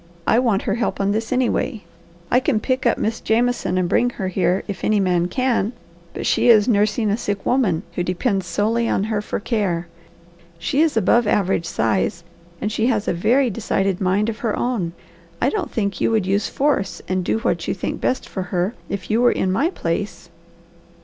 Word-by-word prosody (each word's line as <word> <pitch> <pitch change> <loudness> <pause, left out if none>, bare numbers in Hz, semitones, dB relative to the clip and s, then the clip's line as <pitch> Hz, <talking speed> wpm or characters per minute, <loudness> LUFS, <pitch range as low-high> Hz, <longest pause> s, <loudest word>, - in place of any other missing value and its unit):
I 230 - +4
want 230 -6 +1
her 200 - 0
help 230 +2 -1
on 200 0 +1
this, 220 +2 -2
anyway. 255 -2 0 0.5
I 250 - +5
can 260 -4 +1
pick 255 +2 0
up - - +2
Miss 225 +1 -2
Jameson 235 -4 +1
and 180 -1 +1
bring 245 +7 +2
her 195 -6 -4
here 185 0 +1
if 200 -2 -6
any 215 -1 +2
man 180 -2 +2
can, 245 -1 0 0.4
but - - -4
she - - +3
is 215 -2 +6
nursing 210 -1 +2
a - - +2
sick 205 -4 -3
woman 205 -10 +1
who - - -2
depends 185 +1 -1
solely 220 +6 0
on 195 - +1
her 215 -1 -1
for - - -3
care. 195 -7 -1 0.7
She 270 - 0
is 315 -7 +2
above 225 +3 +3
average 190 -5 +1
size, 175 -1 0 0.4
and 210 - -2
she 220 +2 +1
has 220 -5 0
a - - +2
very 235 +8 +2
decided 195 -2 -1
mind 195 +3 +2
of 225 -1 -3
her 225 -3 -1
own. 210 -9 -1 0.5
I 260 - +2
don't 405 -4 -2
think 200 -3 -2
you - - +3
would 220 -4 +1
use 195 +2 0
force 275 -9 0
and 185 0 0
do 180 - 0
what 225 - -1
you - - -1
think - - -4
best 260 - -1
for 190 - -4
her, 180 +3 0 0.2
if 200 +1 -4
you 225 +2 +3
were 245 - +5
in 185 - 0
my 280 - +2
place. 175 - -4
210 Hz, 205 wpm, -21 LUFS, 190-235 Hz, 0.7 s, is